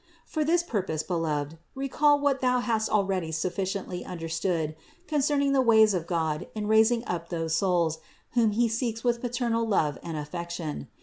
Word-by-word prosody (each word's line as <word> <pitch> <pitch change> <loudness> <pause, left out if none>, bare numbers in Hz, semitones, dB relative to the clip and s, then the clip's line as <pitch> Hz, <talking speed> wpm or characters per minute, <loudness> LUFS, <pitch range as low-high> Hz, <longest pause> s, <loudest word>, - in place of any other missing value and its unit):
For 310 - -1
this 335 +3 +2
purpose, 190 - -2
beloved, 160 -3 -2 0.2
recall 285 +2 +3
what 280 -2 +1
thou 250 -1 +3
hast 230 -3 0
already 190 -5 0
suf 160 +3 -2
ficiently 190 -2 -3
understood 165 -2 -2 0.3
concerning 290 -3 +1
the 270 - +4
ways 220 -3 +5
of 170 -3 -2
God 160 -3 -1
in 210 -1 -3
rais 220 +1 +5
ing 240 -1 -1
up 170 -3 -4
those 165 -2 -2
souls, 170 -2 +1 0.3
whom 230 -2 +3
He 235 +2 +3
seeks 230 0 -2
with 240 -1 +1
paternal 240 -2 0
love 160 -10 +1
and 165 -2 -5
affection. 165 - -5
200 Hz, 170 wpm, -27 LUFS, 165-240 Hz, 0.3 s, ways